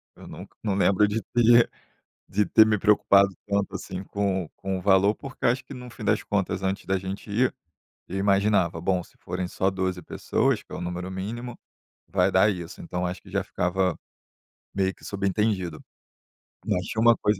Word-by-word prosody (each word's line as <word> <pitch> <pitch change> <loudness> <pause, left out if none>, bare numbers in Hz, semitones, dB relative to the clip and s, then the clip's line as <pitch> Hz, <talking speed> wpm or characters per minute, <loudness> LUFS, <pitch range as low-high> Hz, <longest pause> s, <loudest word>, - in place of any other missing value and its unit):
Eu - - -13
nunca - - -11
não 105 -3 0
lembro 100 +1 +4
de 105 +2 -1
ter 120 0 +6 0.6
de 105 +2 +2
ter 110 +3 +6
me 110 -1 +2
preocupado 100 -1 +4
tanto, 100 -1 -1
assim, 95 0 -6
com 100 -2 -1
o - - -20
com 95 -1 -3
o - - -6
valor, 100 +1 +4
porque 135 +2 -5
acho 125 +2 +1
que, - - -11
no 125 -2 -8
fim 120 -2 -9
das - - +1
contas 95 -2 -1
antes 95 0 -2
da 95 0 0
gente 95 +3 -6
ir, 120 +5 +1 0.5
eu 95 - -4
imaginava: 100 -4 +2
bom 90 0 0
se - - -22
forem 90 0 -4
só 95 +1 0
12 95 -1 -2
pessoas, - - 0
que - - -26
é - - -3
o - - -6
número 90 +1 -4
mínimo, 115 +6 -5 0.5
vai 95 0 +2
dar 95 +3 +4
isso. 85 -3 -8
Então, 90 0 -3
acho 90 +1 -5
que - - -15
já - - 0
ficava 90 -1 -1 0.8
meio 95 -1 +1
que - - -18
subentendido. 100 -4 -1 0.9
Mas 90 0 0
tinha 110 - -2
uma 115 0 +6
coisa 105 -2 +1
95 Hz, 195 wpm, -26 LUFS, 95-105 Hz, 0.9 s, ter